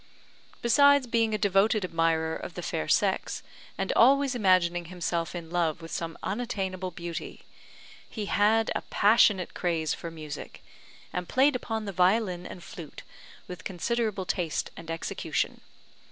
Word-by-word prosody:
Besides 285 +3 +5
being 230 -2 +1
a - - 0
devoted 205 +1 +2
admirer 165 -2 +1
of - - -7
the - - -5
fair - - -2
sex, - - +1 0.3
and - - -1
always 275 +2 +5
imagining 185 -6 +2
himself 170 -1 -3
in 170 -1 -7
love 170 -3 0
with 165 0 -10
some 165 -1 -4
unattainable 190 -4 -3
beauty, 170 -1 -7 0.7
he 215 -3 -4
had 215 +3 +3
a - - -2
passionate 205 -3 +3
craze 165 -4 -1
for 170 - -6
music, 155 -3 -8 0.5
and 180 -1 -3
played 270 +2 +4
upon 225 -3 -3
the 200 - -3
violin 185 0 +2
and 180 - -10
flute 160 -5 -10 0.4
with 180 -2 -8
considerable 210 +1 -1
taste 170 -3 -2
and 165 0 -10
execution. 165 0 -2
185 Hz, 140 wpm, -28 LUFS, 170-220 Hz, 0.7 s, Besides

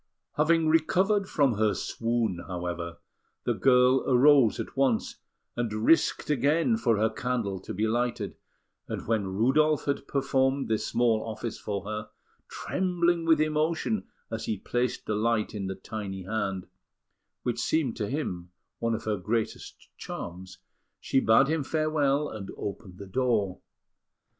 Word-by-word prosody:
Having 160 +1 +3
recovered 185 +6 +2
from 135 -8 +2
her 110 -2 +2
swoon, 115 -6 -1
however, 85 -2 -4 0.5
the - - +1
girl 125 0 +4
arose 130 -2 +5
at - - -5
once, 135 -4 +1 0.4
and 120 -2 -1
risked 110 +8 +2
again 150 - +2
for 115 - +1
her 110 +1 +2
candle 115 -7 -2
to - - -8
be 105 +4 0
lighted; 120 +2 -1 0.5
and - - -5
when 110 -3 0
Rudolf 135 +10 +2
had 140 -1 -2
performed 135 0 +1
this 110 -1 -1
small 115 -2 +2
office 115 0 -5
for 100 -2 -4
her, 105 0 -5 0.4
trembling 175 -2 0
with 160 -2 +5
emotion 155 +8 0 0.2
as 115 - -3
he 110 - -1
placed 120 +5 -2
the - - -1
light 110 +1 0
in 100 -3 -3
the 95 - -4
tiny 95 -1 -6
hand, 95 -2 -2 0.8
which 120 -1 -1
seemed 135 0 0
to 105 -4 -2
him 90 - -3 0.3
one 115 -1 0
of - - -6
her 105 -1 -1
greatest 110 +4 -3
charms, 90 +1 -7 0.4
she 135 - +1
bade 120 +3 +5
him 160 -1 0
farewell, 150 -1 +1
and 105 -6 -7
opened 100 -2 -6
the 100 - -8
door. 105 -3 0
120 Hz, 145 wpm, -28 LUFS, 105-145 Hz, 0.8 s, arose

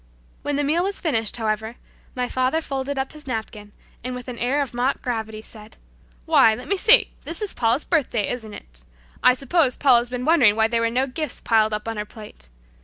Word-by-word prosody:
When 290 0 -2
the 290 - 0
meal 315 +5 +1
was 395 +1 -2
finished, 230 - 0
however, 220 0 -2 0.4
my 250 -1 -1
father 255 +6 0
folded 275 -2 -4
up 265 0 -2
his 305 -2 -12
napkin, 220 -3 -5 0.3
and 250 +1 -4
with 250 0 -8
an 245 -2 -7
air 275 +4 +1
of 260 - -9
mock 245 +3 0
gravity 220 -3 -4
said, 215 -1 -13 0.5
"Why, 220 - +5
let 250 +4 -9
me 400 - +1
see, 445 +6 +5
this 330 - -5
is 420 -2 -4
Paula's 235 +4 +1
birthday; 245 - 0
isn't 225 -4 -6
it? - - -11 0.4
I 250 - +5
suppose 275 0 +1
Paula's 245 -3 +4
been 250 0 -4
wondering 265 -11 +5
why 220 0 +3
there 230 0 0
were 230 - +1
no 255 +3 +1
gifts 275 +1 -3
piled 220 -1 +2
up 210 +1 -4
on 225 -1 -3
her 210 - -3
plate. 210 - -13
245 Hz, 210 wpm, -22 LUFS, 220-280 Hz, 0.5 s, Why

